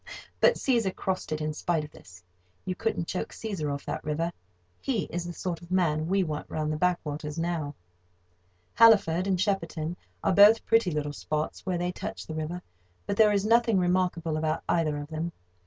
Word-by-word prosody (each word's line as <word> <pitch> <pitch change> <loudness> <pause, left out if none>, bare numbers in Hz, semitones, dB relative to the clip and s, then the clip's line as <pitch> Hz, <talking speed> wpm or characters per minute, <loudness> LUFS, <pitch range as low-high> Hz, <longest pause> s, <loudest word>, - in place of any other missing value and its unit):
But - - +5
Cæsar 230 -8 +1
crossed 190 -3 -3
in 155 0 -1
spite 160 0 -1
of 150 - -10
this. 90 0 -15 0.4
You 185 - -1
couldn't 180 -2 -2
choke 180 - -3
Cæsar 190 -10 -4
off 140 0 -5
that - - -4
river. 165 +3 -1 0.5
He 235 -8 0
is 175 0 -3
the 175 - -5
sort 170 -1 -4
of 170 - -13
man 160 -4 +1
we 195 +2 +2
want 150 -3 -4
round 155 -1 -1
the - - -2
backwaters 155 -3 -1
now. 165 -4 -2 1.0
Halliford 195 -6 +5
and 190 -2 +1
Shepperton 170 -5 -1 0.3
are - - +2
both 205 +4 +7
pretty 225 -4 +3
little 150 -2 -2
spots 155 +4 -3
where 180 -2 0
they 175 +1 -1
touch - - -6
the 160 - -6
river; 160 +3 -4 0.4
but - - -1
there 215 0 +6
is 200 -1 +1
nothing 230 -1 +4
remarkable 175 -3 +1
about 155 +1 -1
either 155 -3 +1
of 145 0 -6
them. 165 +2 -3
175 Hz, 185 wpm, -28 LUFS, 155-190 Hz, 1.0 s, both